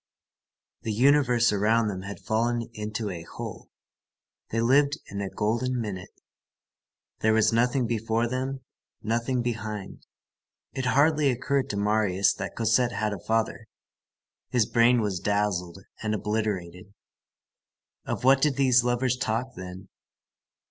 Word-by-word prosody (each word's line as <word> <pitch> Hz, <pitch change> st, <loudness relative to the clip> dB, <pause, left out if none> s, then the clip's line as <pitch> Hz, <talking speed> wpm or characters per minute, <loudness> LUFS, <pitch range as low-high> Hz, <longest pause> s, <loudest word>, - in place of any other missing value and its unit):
The 110 Hz, -, -3 dB
universe 125 Hz, -1 st, +4 dB
around 110 Hz, +2 st, +2 dB
them 95 Hz, -2 st, -4 dB
had 100 Hz, +1 st, -7 dB
fallen 115 Hz, +1 st, -1 dB
into 105 Hz, -1 st, -4 dB
a 85 Hz, -2 st, -6 dB
hole. 80 Hz, -, -8 dB, 0.8 s
They 115 Hz, -, -1 dB
lived 140 Hz, +5 st, +3 dB
in 100 Hz, 0 st, -4 dB
a 100 Hz, -, -3 dB
golden 120 Hz, +5 st, -1 dB
minute. 100 Hz, -5 st, -5 dB, 1.1 s
There 110 Hz, 0 st, +3 dB
was 110 Hz, 0 st, +3 dB
nothing 125 Hz, +2 st, +2 dB
before 115 Hz, 0 st, 0 dB
them, 130 Hz, +2 st, -3 dB, 0.4 s
nothing 120 Hz, +3 st, 0 dB
behind. 110 Hz, -4 st, -5 dB, 0.7 s
It 130 Hz, -1 st, -2 dB
hardly 145 Hz, +2 st, +3 dB
occurred 135 Hz, +2 st, 0 dB
to 100 Hz, -, -3 dB
Marius 100 Hz, -2 st, +2 dB
that 100 Hz, -1 st, -6 dB
Cosette 115 Hz, +1 st, +2 dB
had 105 Hz, +1 st, -1 dB
a 100 Hz, -, -6 dB
father. 110 Hz, +2 st, -1 dB, 0.8 s
His 120 Hz, -4 st, +2 dB
brain 120 Hz, +2 st, +4 dB
was 100 Hz, -4 st, -1 dB
dazzled 100 Hz, -4 st, -1 dB, 0.2 s
and 110 Hz, -1 st, -1 dB
obliterated. 100 Hz, -3 st, -3 dB, 1.1 s
Of -, -, -4 dB
what 135 Hz, +1 st, +5 dB
did 150 Hz, -2 st, +2 dB
these 130 Hz, -2 st, +4 dB
lovers 125 Hz, +1 st, +1 dB
talk 125 Hz, +1 st, -2 dB
then? 90 Hz, +1 st, -9 dB
115 Hz, 130 wpm, -26 LUFS, 105-125 Hz, 1.1 s, what